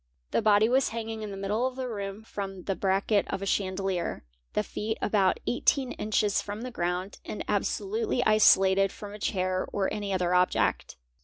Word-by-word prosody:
The - - +2
body 215 0 +5
was 260 +2 +3
hanging 225 -1 -5
in 215 - -5
the 195 - -6
middle 210 +6 0
of 260 - -6
the 260 -1 -3
room 200 -2 -5
from 195 -4 -6
the 195 - -1
bracket 195 +2 +1
of 195 0 -3
a - - -2
chandelier, 190 - -1 0.3
the - - +1
feet 220 +1 -3
about 195 -3 +2
18 255 +1 +1
inches 210 -1 0
from 205 +2 -6
the 250 +1 -5
ground 180 -1 -3
and - - -6
absolutely 405 - 0
isolated 195 -2 +5
from 205 -1 -9
a 210 - -9
chair 185 -2 -1
or 195 -2 -1
any 205 -1 -3
other 180 -2 +1
object. 180 0 +1
205 Hz, 180 wpm, -28 LUFS, 195-220 Hz, 0.3 s, body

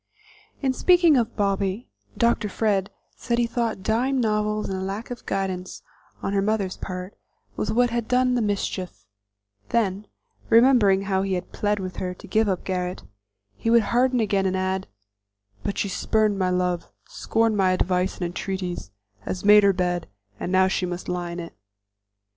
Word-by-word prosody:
In 265 -1 +2
speaking 345 +1 +5
of 235 -2 0
Bobby, 200 +1 -1 0.3
Dr. 235 -3 +2
Fred 200 -2 0 0.3
said 235 -1 -2
he 240 - +3
thought 230 -4 -2
dime 250 +6 +1
novels 210 -2 0
and 190 0 -3
lack 205 +5 -5
of 245 - -8
guidance 185 -2 -3 0.4
on 195 - -1
her 200 - +2
mother's 200 -2 0
part 185 +1 -6 0.4
was 210 - -2
what 245 +2 +3
had 235 -1 -2
done 250 0 +2
the 245 - +1
mischief; 190 - -3 0.6
then, 210 -3 0 0.4
remembering 225 -5 +5
how 190 -1 0
he 195 0 -1
had 180 0 -4
plead 210 0 0
with 185 -1 -6
her 180 -1 -3
to - - -13
give 220 -1 +2
up 185 -2 -1
Garret, 180 -1 -3 0.5
he 225 - -2
would 230 -1 +5
harden 250 +1 +3
again 200 -3 +1
and 190 0 0
add: 190 0 -1 0.7
"But 200 - -3
she - - 0
spurned 210 +1 +1
my 185 -1 +2
love, 180 -1 -1 0.2
scorned 225 -1 0
my 190 -2 +3
advice 185 0 +1
and 180 - -2
entreaties, 180 - -4 0.3
has 180 - -5
made 210 0 +8
her 200 -1 +5
bed, 180 -2 -1 0.3
and 180 - -3
now 190 0 +4
she 190 -1 -1
must 175 0 -5
lie 175 -1 -2
in 170 +1 -5
it." 170 -1 -7
195 Hz, 170 wpm, -24 LUFS, 185-225 Hz, 0.7 s, made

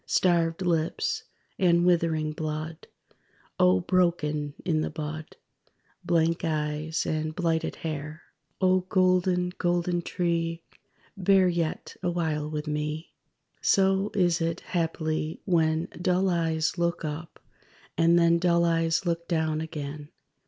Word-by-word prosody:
Starved 170 -1 +2
lips, 165 -2 0 0.3
and 175 -2 +4
withering 165 -3 +2
blood 155 +1 -5 0.7
O 90 0 +5
broken 150 - 0
in 160 -3 +1
the - - -1
bud! 155 0 -6 0.7
Blank 165 0 +1
eyes, 155 0 -1
and 155 0 -2
blighted 165 -2 0
hair._ 155 0 -5 0.4
(O 185 -1 +4
golden, 185 -1 +2
golden 175 0 +1
tree! 165 -1 -1 0.5
Bear 195 -1 +4
yet 170 -3 -2
awhile 160 -4 -1
with 150 0 -4
me.) 150 +1 -3 0.5
So 195 +1 +3
is 175 -3 +2
it, 165 +1 -1
haply, 160 -4 -2
when 160 -3 +2
Dull 185 +1 +2
eyes 165 -1 0
look 170 -1 0
up, 155 +2 -6 0.6
and 170 +1 +4
then 170 0 +4
Dull 170 -1 +3
eyes 165 +1 +1
look 170 -1 -1
down 160 -2 0
again. 150 -2 -6
165 Hz, 115 wpm, -27 LUFS, 155-175 Hz, 0.7 s, O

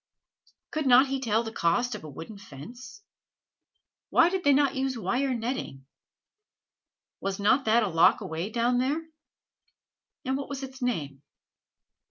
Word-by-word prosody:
Could 305 -2 -2
not 260 +2 +6
he 270 0 -1
tell 225 -3 +1
the 225 - -6
cost 235 +7 0
of - - -7
a 155 - -8
wooden 165 +9 -9
fence? 220 - -11 1.1
Why 335 - +5
did 380 -1 -2
they 285 - +5
not 280 0 +3
use 265 -1 -2
wire 250 +6 0
netting? 230 - -4 1.3
Was 195 0 -3
not 255 +7 +3
that 225 +2 +4
a - - 0
loch 165 -2 +4
away 165 +5 -4
down 240 +2 +1
there? 295 +6 -1 1.2
and 260 +1 0
what 280 - -6
was 275 -1 -5
its 265 0 -9
name? 145 - -2
245 Hz, 150 wpm, -27 LUFS, 200-270 Hz, 1.3 s, not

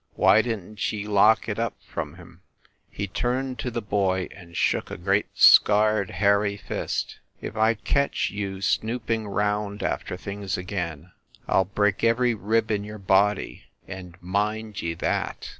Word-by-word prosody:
Why 110 - +5
didn 110 -3 -5
t 105 - -1
ye 105 - -4
lock 105 +1 +4
it 105 0 -3
up 115 -1 -1
from - - -6
him - - -15 0.2
?" - - -33
He 100 - -4
turned 125 +6 -2
to 125 - -2
the 120 -2 -4
boy 95 -3 0
and 85 -3 -12
shook - - +1
a - - -6
great 95 +3 +1
scarred 105 -1 +6
hairy 100 0 +2
fist. - - -4 0.2
"If - - -7
I 110 +1 +3
ketch 140 +6 0
you 100 -2 -4
snooping 110 0 -1
round 105 0 -1
after 90 - -2
things 100 0 -4
again, 90 -3 -5 0.4
I - - +3
ll 95 - +2
break 105 +1 0
every 120 +1 +3
PROLOGUE 110 - -9
5 105 - -9
rib 115 0 +2
in 100 -1 0
your 105 +1 -8
body, 100 +1 +1 0.2
and 95 -2 -9
mind 105 +3 -2
ye 85 0 -3
that!" - - -2
105 Hz, 175 wpm, -25 LUFS, 95-110 Hz, 0.4 s, scarred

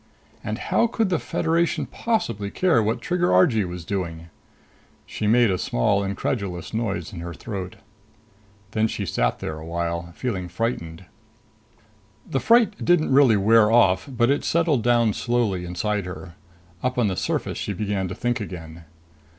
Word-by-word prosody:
And - - -3
how 235 - +1
could 225 -3 0
the 175 -4 +1
Federation 165 +1 0
possibly 115 - -2
care 170 - +2
what 110 +2 -1
Trigger 180 0 0
Argee 110 - +4
was 90 -1 -7
doing? 85 -4 -4 0.8
She 105 - -3
made 115 -1 +4
a 90 - -1
small, 100 +12 +1
incredulous 100 -2 -3
noise 110 -5 -2
in 90 - -7
her 85 0 -6
throat. 95 -5 -6 1.0
Then 110 0 +1
she 105 -2 -4
sat - - 0
there 80 0 -5
a - - -9
while, 85 +1 -3
feeling 95 -8 -3
frightened. 90 -4 -3 1.2
The 135 - -1
fright 230 - +3
didn't 170 -5 +3
really 130 -6 +6
wear 110 +2 +5
off, 95 -3 +3
but 120 -1 +2
it 145 - 0
settled 160 -6 +2
down 120 -2 +3
slowly 115 -8 -1
inside 100 +3 -2
her. 90 -1 -8 0.5
Up 130 0 -1
on 120 - +3
the 95 -3 0
surface - - -2
she - - -3
began 100 -1 -2
to 90 - -6
think 120 +2 -1
again. 85 -4 -8
105 Hz, 160 wpm, -23 LUFS, 90-125 Hz, 1.2 s, really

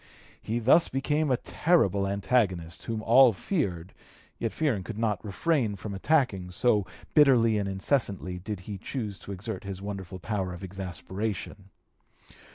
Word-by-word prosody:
He 110 +2 -2
thus 130 +9 +5
became 145 +3 0
a 130 - +3
terrible 100 - +2
antagonist, 100 -4 0
whom 110 -1 -3
all 120 +1 +7
feared, 95 - -2 0.5
yet 115 - -1
fearing 130 -12 0
could 105 +3 -7
not 105 -5 -1
refrain 115 - 0
from 100 +2 -6
attacking, 100 - +1
so 105 +1 +2 0.3
bitterly 120 -7 +5
and 100 -1 -2
incessantly 95 -3 -1
did 95 +1 -5
he 100 +1 -7
choose 105 -3 -5
to - - -9
exert 100 +1 -5
his 95 -1 -6
wonderful 95 -2 -6
power 95 -1 -3
of 90 - -10
exasperation. 95 +2 -5
105 Hz, 145 wpm, -28 LUFS, 95-120 Hz, 0.5 s, all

